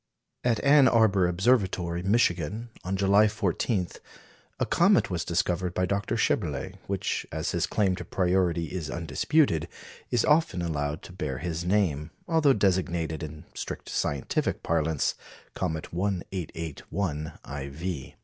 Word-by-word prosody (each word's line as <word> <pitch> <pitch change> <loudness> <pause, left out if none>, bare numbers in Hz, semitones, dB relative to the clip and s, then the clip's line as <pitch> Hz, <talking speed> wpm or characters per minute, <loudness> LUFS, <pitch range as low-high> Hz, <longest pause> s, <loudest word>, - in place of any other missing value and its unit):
At 120 -3 +2
Ann 140 -1 +7
Arbor 105 -6 +4
Observatory, 90 -3 +1
Michigan, 100 +1 +1
on 95 +2 -2
July 100 +2 +5
14, 95 -1 0 0.7
a - - +2
comet - - +3
was - - -1
discovered 90 0 -1
by 90 - +2
Dr. 100 +2 -1
Schaeberle, - - 0
which, - - -2
as 80 +2 -2
his 85 0 0
claim 100 -4 +1
to - - -5
priority 90 -3 +1
is 85 -5 -3
undisputed, 85 - +1 0.4
is 120 -3 +2
often 150 - +3
allowed 75 -2 -2
to - - -11
bear 75 -7 -3
his 80 +4 -3
name, 90 -6 +1 0.2
although 160 -4 +4
designated, 90 -6 0
in 75 -1 -7
strict - - -6
scientific 70 -3 -1
parlance, 80 -2 +1 0.4
comet 80 0 -3
1881 85 -3 -3
iv. 70 +2 -5
90 Hz, 130 wpm, -27 LUFS, 80-100 Hz, 0.7 s, Ann